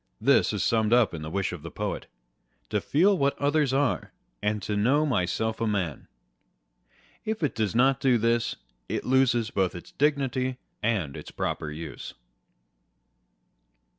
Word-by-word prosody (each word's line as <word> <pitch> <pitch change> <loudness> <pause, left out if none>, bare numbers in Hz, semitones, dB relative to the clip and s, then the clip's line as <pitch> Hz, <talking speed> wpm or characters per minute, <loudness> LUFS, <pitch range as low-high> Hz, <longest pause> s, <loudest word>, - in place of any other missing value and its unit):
This - - +4
is - - -1
summed 110 -1 +2
up 120 -5 +4
in 80 - -5
the 75 - -5
wish 95 +3 -1
of 85 - -7
the 85 - -7
poet - - -4 0.6
â€" - - -37
To - - 0
feel 190 +7 +3
what 140 -4 +1
others 145 -1 +2
are, 135 -1 0 0.3
and 105 0 -1
know 125 +9 +2
myself 110 - 0
a 115 - +1
man. 95 -8 -2 1.2
If 220 -5 -3
it 150 - +1
does 110 -1 -1
not 135 +2 +4
do 130 -3 +3
this, 115 +1 +1 0.3
it - - -2
loses 125 -3 +2
both 95 -3 0
its 90 - -9
dignity 135 -3 0 0.2
and 100 -11 0
its - - -8
proper 75 - -3
use. 75 0 -7
115 Hz, 155 wpm, -27 LUFS, 100-135 Hz, 1.2 s, This